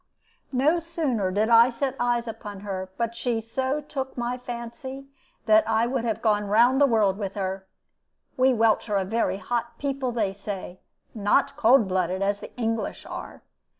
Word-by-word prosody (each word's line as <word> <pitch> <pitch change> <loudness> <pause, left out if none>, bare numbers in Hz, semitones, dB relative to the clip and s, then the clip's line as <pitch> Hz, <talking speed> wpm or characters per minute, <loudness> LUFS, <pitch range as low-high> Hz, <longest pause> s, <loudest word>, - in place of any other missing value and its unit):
No 290 +6 +3
sooner 305 - -1
did 210 +4 +1
I 230 +1 +7
set 265 +2 -2
eyes 240 -1 +1
upon 205 -3 -7
her 190 -2 -5
but 235 -1 -1
she 235 -1 -1
so 260 +6 -2
took 270 -3 -5
my 240 +1 -1
fancy 250 +3 -7 0.4
that 215 -1 +6
I 225 +1 +3
would 240 -1 -1
have 225 -2 -2
gone 210 -2 +2
round 240 +6 +4
the 285 - +7
world 210 -5 +2
with 195 -2 -4
her. 190 -1 -3 0.7
We 260 -1 +4
Welsh 225 -2 +2
are 205 - +2
a 190 - 0
very 220 -1 0
hot 235 +2 -3
people, 275 -2 -2
they 215 -5 -1
say 195 -2 -7 0.3
not 240 +6 +1
cold 240 -4 +5
blooded, 185 0 0
as 200 +1 0
the - - -9
English 225 -2 -2
are. - - -8
230 Hz, 175 wpm, -25 LUFS, 205-255 Hz, 0.7 s, I